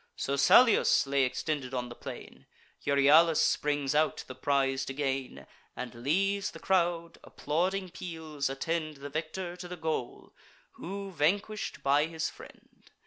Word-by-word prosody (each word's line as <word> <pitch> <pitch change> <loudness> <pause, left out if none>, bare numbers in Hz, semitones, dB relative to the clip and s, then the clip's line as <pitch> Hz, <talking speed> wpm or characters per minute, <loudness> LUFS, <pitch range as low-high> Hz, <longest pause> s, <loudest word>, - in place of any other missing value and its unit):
So 140 - -2
Salius 230 - +5
lay 140 0 +1
extended 135 0 -3
on 125 -1 -3
the - - -7
plain; - - -10 0.4
Euryalus 150 +4 +5
springs 145 -2 +1
out, 155 +1 +1
the 130 - -8
prize 135 0 0
to 135 - -5
gain, 135 - -3 0.3
And 125 -1 -6
leaves 195 - 0
the - - -11
crowd: 170 -3 0
applauding 180 +5 -2
peals 160 -6 -4
attend 155 +2 -3
The 140 +1 -8
victor 175 +3 -4
to 180 0 -8
the 180 0 -7
goal, 160 -6 -4 0.4
who 195 +2 -7
vanquish'd 195 +7 -1
by 145 +3 +3
his 160 -1 -3
friend. - - -16
155 Hz, 140 wpm, -30 LUFS, 140-175 Hz, 0.4 s, Salius